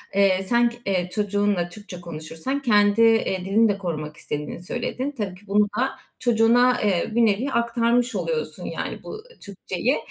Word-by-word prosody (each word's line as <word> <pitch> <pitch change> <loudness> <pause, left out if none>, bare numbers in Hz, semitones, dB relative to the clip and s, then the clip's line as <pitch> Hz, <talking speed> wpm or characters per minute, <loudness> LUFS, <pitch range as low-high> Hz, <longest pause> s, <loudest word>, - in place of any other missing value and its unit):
Eee, 195 -1 +3
sen 240 0 +4
k 195 -7 -2
çocuğunla 205 -3 0
Türkçe 205 -3 -10
konuşursan 165 - -4
kendi, 210 -3 +4
ııı, 225 -5 +3
dilini 215 +3 +3
de 200 - 0
korumak 155 -5 -5
istediğini 150 +3 -5
söyledin. 250 +6 -3
Tabii 195 -4 -3
ki 205 +2 -19
bunu 205 +1 +3
da 265 +1 +2 0.3
çocuğuna, 240 +1 +4
ııı, 205 +2 0
bir 235 -1 +5
nevi 220 +6 +1
aktarmış 235 +1 +1
oluyorsun 480 -2 -3
yani - - -5
bu 435 0 -8 0.2
Türkçeyi 200 +5 -2
210 Hz, 155 wpm, -23 LUFS, 185-235 Hz, 0.3 s, bir